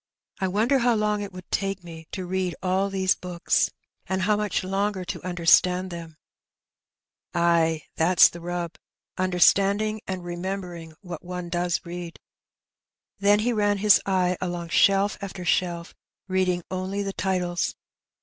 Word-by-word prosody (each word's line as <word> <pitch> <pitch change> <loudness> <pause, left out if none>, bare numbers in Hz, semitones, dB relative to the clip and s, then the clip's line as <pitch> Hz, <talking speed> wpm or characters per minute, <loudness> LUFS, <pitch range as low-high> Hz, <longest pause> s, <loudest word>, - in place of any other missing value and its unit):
I 190 - 0
wonder 225 +9 +2
how 240 -1 +3
long 210 -1 0
it 200 - -5
would 185 -1 -12
take 195 -2 -1
me 165 -2 -10
to 185 -2 -4
read 185 -1 -2
all 190 +2 +1
these 190 -1 +2
books, 175 -1 0 0.4
and 190 0 -1
how 210 +2 +3
much 210 -2 -1
longer 195 0 -1
to - - -5
understand 180 +1 +3
them? 165 -2 -8 1.2
Ay, 165 -2 +2
that's 175 +2 +6
the 170 - -9
rub 175 -1 -4 0.2
— - - -57
understanding 200 +4 +3
and 185 -2 -4
remembering 175 -2 -5
what 175 -5 -8
one 180 -1 -6
does 175 0 -1
read.^' 170 -1 -7 1.0
Then 205 +1 +4
he 240 +2 +1
ran 205 -2 +2
his 205 0 +5
eye 185 -2 +1
along 175 -2 -3
shelf 195 +3 +3
after 195 -2 -6
shelf, 170 -1 0 0.3
reading 185 -2 0
only 190 +2 -2
the 195 0 -4
titles. 180 -3 -1
185 Hz, 150 wpm, -25 LUFS, 175-195 Hz, 1.2 s, that's